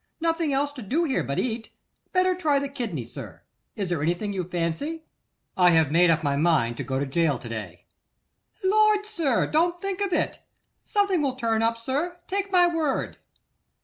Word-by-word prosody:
Nothing 330 -2 0
else 280 +1 +1
to 280 -3 -9
do 275 - 0
here 285 -6 0
but 140 - -3
to - - +1
eat. 225 -2 -4 0.4
Better 370 0 +3
try 315 -6 +1
the 280 0 -1
kidney, 230 - -4
sir. 120 - -10 0.3
Is 195 -4 -3
there 170 -4 -1
anything 175 +6 -1
you 185 -2 -2
fancy?' 180 - -3 0.5
'I 180 -1 +6
have 160 -4 +3
made 175 +2 +5
up 160 -1 +2
my 140 -1 +1
mind 140 -7 +2
to - - -3
go 130 - -2
to 140 - 0
gaol 150 +1 +1
to - - -10
day.' 105 -7 -7 0.8
'Lord! 420 +1 +4
sir, 330 - 0
don't 345 +3 +1
think 390 0 -3
of 400 -2 0
it. - - 0 0.4
Something 400 -5 +1
will 270 -3 0
turn 225 -3 0
up, 230 0 +1
sir, 290 +10 -2
take 395 +1 -2
my 360 -2 +6
word. 325 -5 -1
260 Hz, 190 wpm, -25 LUFS, -, 0.8 s, I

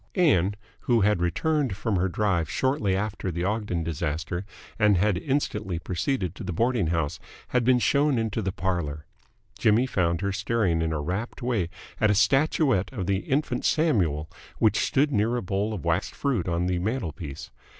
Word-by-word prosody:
Ann, 100 - +3 0.2
who 120 -3 +2
had 105 -3 +2
returned 130 - 0
from 105 0 -1
her 95 +2 +1
drive 85 -3 0
shortly 130 -8 +1
after 105 -1 -2
the 85 0 -3
Ogden 105 -4 -1
disaster 80 +3 -3 0.3
and 105 -3 +5
had 100 +2 +2
instantly 105 - -1
proceeded 90 - -2
to - - -9
the - - -3
boarding 115 +1 +1
house, 80 -2 -1 0.3
had 125 -1 +2
been 125 +1 +4
shown 140 +4 +2
into 110 -1 -1
the 95 -2 -1
parlour. 85 -5 -3 0.5
Jimmy 110 +4 +4
found 85 -8 0
her 100 0 0
staring 100 -4 0
in 80 0 0
a 80 - -1
rapt 95 - -4
way 110 -9 0 0.3
at 110 - +3
a 105 - +3
statuette 135 - +2
of 105 -8 -4
the 95 +1 +1
Infant 130 +3 -1
Samuel 90 - +1 0.3
which - - +3
stood 145 +2 +2
near 115 0 +1
a 120 - -2
bowl 100 +3 -1
of 100 -8 -5
wax - - +1
fruit 125 -11 -1
on 85 0 0
the 90 -1 0
mantelpiece. 90 - -4
100 Hz, 175 wpm, -26 LUFS, 85-120 Hz, 0.5 s, and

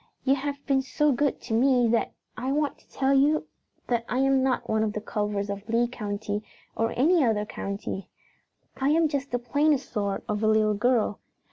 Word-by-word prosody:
"You 270 - +4
have 280 +1 -3
been 270 -2 +2
so 295 +3 +1
good 280 +2 0
to 230 - -5
me 250 +1 +4
that 230 0 +1 0.2
I 260 +2 -2
want 290 0 -1
to - - -28
tell 270 0 +1
you 290 +3 +3 0.4
that 235 -2 0
I 250 - -1
am 270 0 +3
not 260 -1 0
one 220 0 +1
of 215 -1 0
the 210 - -2
Culvers 205 -1 -2
of 200 +2 -6
Lee 235 +1 +2
County 210 -3 -4 0.3
or 225 0 0
any 320 +5 +4
other 215 -4 +1
county. 200 -1 -5 0.7
I 270 +1 +1
am 320 +1 +4
just 280 -2 -3
the 245 - 0
plainest 285 +4 +1
sort 200 -3 -2
of 210 0 -2
a 215 - +2
little 215 -1 +3
girl. 225 -1 +1
245 Hz, 200 wpm, -26 LUFS, 215-275 Hz, 0.7 s, You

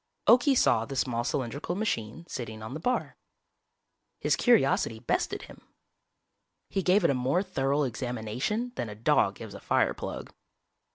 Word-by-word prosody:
Okie 255 +3 +6
saw 110 - +4
the 135 +4 -6
small 120 -1 0
cylindrical 135 +6 -2
machine 165 - -3
sitting 110 -5 -6
on 110 - -6
the 155 - -5
bar. 250 +10 -1 1.0
His - - +2
curiosity 140 - +3
bested 115 - -1
him. - - -13 1.1
He 195 - -1
gave 185 +2 +3
it 170 - +4
a - - +2
more 130 +9 +1
thorough 140 -4 0
examination 125 - -2
than 115 - -2
a 105 - -7
dog 110 - +2
gives - - -9
a - - -8
fireplug. - - -1
135 Hz, 150 wpm, -28 LUFS, 115-185 Hz, 1.1 s, Okie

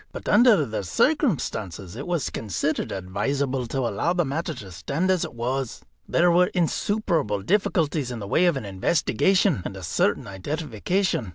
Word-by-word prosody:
But - - -8
under 230 - +5
the 110 -4 -4
circumstances 110 - 0
it 140 +7 -6
was 175 -5 -1
considered 105 -5 -2
advisable 130 +8 -2
to 135 +3 -2
allow 120 - 0
the 175 -2 +1
matter 155 +3 -3
to 95 -3 -10
stand 155 - -1
as 185 -3 +1
it - - -6
was. 125 +1 -3 0.3
There 175 +1 +4
were 180 +1 +5
insuperable 170 - 0
difficulties 165 - +1
in 120 - -4
the 100 -3 -6
way 175 - +3
of 170 -5 +2
an 130 - -5
investigation 160 - +2
and 95 - -6
a 95 - -9
certain 90 - +1
identification. 145 - -2
140 Hz, 165 wpm, -24 LUFS, 105-175 Hz, 0.3 s, under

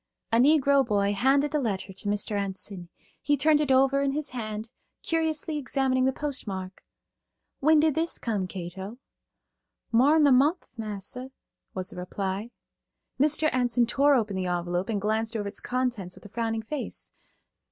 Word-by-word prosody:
A 230 - +4
Negro 280 +1 +5
boy 200 -3 +1
handed 275 +7 +2
a 300 - +2
letter 200 -6 -3
to 205 +2 -5
Mr. 205 +1 0
Enson. 195 -2 -3 0.3
He 290 0 +1
turned 300 +2 +4
it 285 -3 0
over 270 +1 +4
in 275 -1 0
his 300 0 -3
hand, 220 -2 -5 0.3
curiously 320 -1 0
examining 260 -1 +1
the 265 - +3
postmark. 200 -11 -5 0.8
"When 310 +2 +5
did 310 0 +3
this 330 +3 0
come, 205 -6 -2
Cato?" 190 +4 -7 0.9
"More'n 290 +7 +5
a 285 - +5
munf, 290 +8 +4
massa," 220 +3 -5 0.5
was 185 +2 -4
the - - -11
reply. 190 +4 -4 0.7
Mr. 305 +2 +4
Enson 245 -1 +2
tore 280 +3 +4
open 215 -5 0
the 185 -1 -2
envelope 175 +2 -2
and 210 -3 0
glanced 220 +2 -1
over 205 -2 -3
its 200 - -5
contents 245 -8 -2
with - - -16
a - - -10
frowning 225 0 -2
face. 290 +5 -6
235 Hz, 160 wpm, -27 LUFS, 200-280 Hz, 0.9 s, Negro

